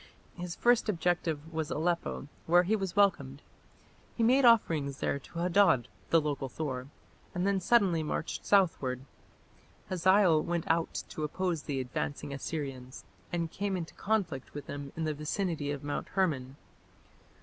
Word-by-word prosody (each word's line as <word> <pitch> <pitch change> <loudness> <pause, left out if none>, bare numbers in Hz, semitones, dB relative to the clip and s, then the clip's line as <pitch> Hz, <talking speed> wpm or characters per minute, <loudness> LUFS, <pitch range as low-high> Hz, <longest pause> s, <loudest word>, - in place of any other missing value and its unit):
His 175 -1 -6
first 240 -2 +3
objective 165 -4 -1
was 160 -1 -2
Aleppo, 170 -2 -1 0.2
where 175 +2 +6
he 205 +5 +2
was 195 -4 -3
welcomed. 150 -9 +2 0.7
He 230 - +2
made 255 +3 +5
offerings 160 - +4
there 140 - -1
to 155 - -13
Hadad, 175 - +3 0.2
the 165 - +5
local 145 -3 -2
Thor, 130 -3 -4 0.5
and 180 +1 0
then 200 -1 +2
suddenly 190 -4 +3
marched 155 +1 -3
southward. 155 -10 +2 0.9
Hazael 185 -2 +4
went 170 0 -2
out 165 0 -1
to - - -6
oppose 170 +1 -1
the 140 -3 -3
advancing 140 +3 -3
Assyrians, 135 -3 -5 0.3
and 170 -2 -2
came 200 -1 -2
into 165 -2 -6
conflict 185 - -2
with 145 - -6
them 140 -1 -6
in 165 - -1
the 155 -1 0
vicinity 150 0 -2
of 145 -1 -4
Mount 145 0 -3
Hermon. 140 -9 -1
165 Hz, 150 wpm, -31 LUFS, 145-185 Hz, 0.9 s, where